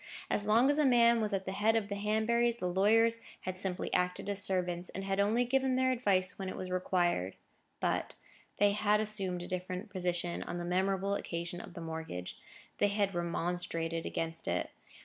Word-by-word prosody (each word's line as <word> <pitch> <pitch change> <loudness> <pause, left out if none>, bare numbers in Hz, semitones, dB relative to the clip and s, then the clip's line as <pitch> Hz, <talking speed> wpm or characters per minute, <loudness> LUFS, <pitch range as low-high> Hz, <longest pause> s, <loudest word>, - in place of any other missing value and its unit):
As 205 - +1
long 235 +6 +5
as 290 - +1
a - - +4
man 235 -3 +5
was 215 -1 -1
at 195 -1 -1
the 190 - -3
head 215 +3 +2
of 220 -3 +1
the 205 - -4
Hanburys, 220 +3 +1
the 185 - -4
lawyers 220 +5 +3 0.2
had 185 0 -5
simply 185 -2 -3
acted 180 +2 0
as 200 0 +1
servants, 180 -2 +1
and 195 - -6
had 195 0 -1
only 220 +5 +3
given 265 +1 +1
their 260 0 +3
advice 195 -8 +1
when 190 -1 -3
it - - -5
was 185 -1 -5
required. 175 - 0 0.4
But - - -1 0.4
they 205 0 +4
had 210 0 +2
assumed 195 -5 -1
a - - -7
different 185 +2 -4
position 175 -2 -1
on 175 - -5
the 175 - -4
memorable 190 +2 0
occasion 170 -2 -4
of - - -12
the 170 - -6
mortgage: 160 - -6 0.4
they 205 - +4
had 200 -1 0
remonstrated 170 -1 -2
against 165 0 -4
it. - - -1
195 Hz, 190 wpm, -32 LUFS, 180-215 Hz, 0.4 s, long